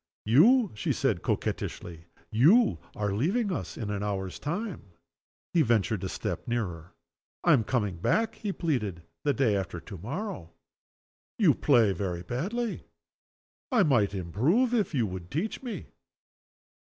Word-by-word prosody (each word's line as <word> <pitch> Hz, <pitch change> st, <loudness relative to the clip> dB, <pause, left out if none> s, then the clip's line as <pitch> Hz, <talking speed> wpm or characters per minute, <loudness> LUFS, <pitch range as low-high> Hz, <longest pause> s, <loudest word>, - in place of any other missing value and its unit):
"You!" 205 Hz, -, +5 dB
she 105 Hz, -, -1 dB
said, -, -, 0 dB
coquettishly. 85 Hz, -1 st, -3 dB, 0.3 s
"You 170 Hz, -, +5 dB, 0.2 s
are 105 Hz, -1 st, -1 dB
going 100 Hz, +1 st, -2 dB
to 160 Hz, -, +1 dB
leave 220 Hz, -5 st, 0 dB
us 180 Hz, -, -4 dB
in 105 Hz, -3 st, -3 dB
an 100 Hz, -1 st, -2 dB
hour's 95 Hz, -2 st, -3 dB
time!" 170 Hz, -, -4 dB, 0.6 s
He 170 Hz, -, +4 dB
ventured 110 Hz, -, +1 dB
a 95 Hz, -, -2 dB
step -, -, -4 dB
nearer. 90 Hz, -8 st, -3 dB, 0.5 s
"I -, -, +6 dB
am 115 Hz, -, +4 dB
coming 105 Hz, -6 st, -1 dB
back," 220 Hz, -, +1 dB
he 210 Hz, -3 st, -4 dB
pleaded, 110 Hz, -, -2 dB, 0.2 s
"the 145 Hz, -, +2 dB
day 120 Hz, -7 st, +2 dB
after 95 Hz, -3 st, -3 dB
to 95 Hz, -, -9 dB
morrow." 140 Hz, -, -5 dB, 0.8 s
"You -, -, +5 dB
play 110 Hz, -4 st, +4 dB
very 90 Hz, -3 st, -3 dB
badly!" 205 Hz, -, -3 dB, 0.8 s
"I 235 Hz, -6 st, +5 dB
might 110 Hz, -, +2 dB
improve 135 Hz, -, +1 dB
if 205 Hz, -9 st, +1 dB
you 120 Hz, -4 st, +2 dB
would 90 Hz, -3 st, -6 dB
teach 180 Hz, -, -2 dB
me." 245 Hz, -4 st, -5 dB
120 Hz, 150 wpm, -28 LUFS, -, 0.8 s, I